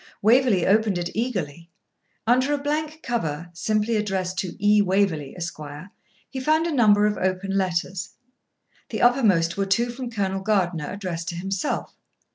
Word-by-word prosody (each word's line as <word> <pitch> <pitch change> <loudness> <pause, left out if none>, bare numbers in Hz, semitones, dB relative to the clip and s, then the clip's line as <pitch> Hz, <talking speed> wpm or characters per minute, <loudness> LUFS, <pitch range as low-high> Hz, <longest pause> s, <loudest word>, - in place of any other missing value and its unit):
Waverley 230 -4 +4
opened 210 -1 +3
it 175 0 -3
eagerly. 175 - -3 0.6
Under 255 +5 +3
a - - -2
blank 305 +2 -3
cover, 170 -8 -3
simply 215 +5 0
addressed 190 -3 -2
to 185 - -4
E. 205 +1 +4
Waverley, 185 -7 0
Esq., 170 -3 -5 0.7
he 265 - -6
found 310 +5 +2
a 340 - -1
number 210 -5 +5
of 210 -1 +1
open 190 +1 -1
letters. 185 0 -1 0.8
The - - -2
uppermost 205 -10 +3
were 195 0 0
two 235 +5 +1
from 250 0 -6
Colonel 195 -4 -2
Gardiner 180 -7 0
addressed 180 -4 -5
to 170 - -5
himself. 190 +2 -3
195 Hz, 150 wpm, -24 LUFS, 180-235 Hz, 0.8 s, number